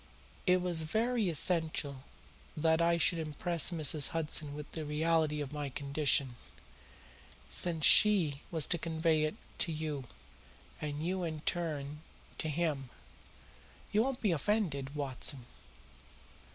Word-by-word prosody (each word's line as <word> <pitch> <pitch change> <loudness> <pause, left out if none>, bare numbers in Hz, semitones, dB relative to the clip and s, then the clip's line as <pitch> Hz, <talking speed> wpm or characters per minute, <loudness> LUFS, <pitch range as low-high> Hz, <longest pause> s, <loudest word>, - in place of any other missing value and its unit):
It 180 0 +3
was 175 -3 0
very 220 +5 0
essential 155 -5 +1 0.5
that 160 +1 +2
I 170 0 +3
should 170 0 +2
impress 160 +1 +1
Mrs. 155 -4 +2
Hudson 150 -2 +1
with 150 0 -9
the 160 - -5
reality 155 0 0
of 145 0 -6
my 145 -1 -4
condition, 140 -2 +1 1.1
since 160 - +1
she 175 -10 +6
was 160 -5 +1
to 170 - 0
convey 160 -1 0
it 155 - -3 0.2
to 170 - 0
you, 155 -4 -4 0.8
and 150 +1 -4
you 185 +1 -2
in 155 -3 -4
turn 150 -4 -3 0.4
to 155 - -2
him. 150 -4 -2 1.0
You 210 - +3
won't 265 +1 -2
be 210 - +1
offended, 155 -6 -1
Watson? 135 -2 -3
155 Hz, 125 wpm, -32 LUFS, 145-170 Hz, 1.1 s, she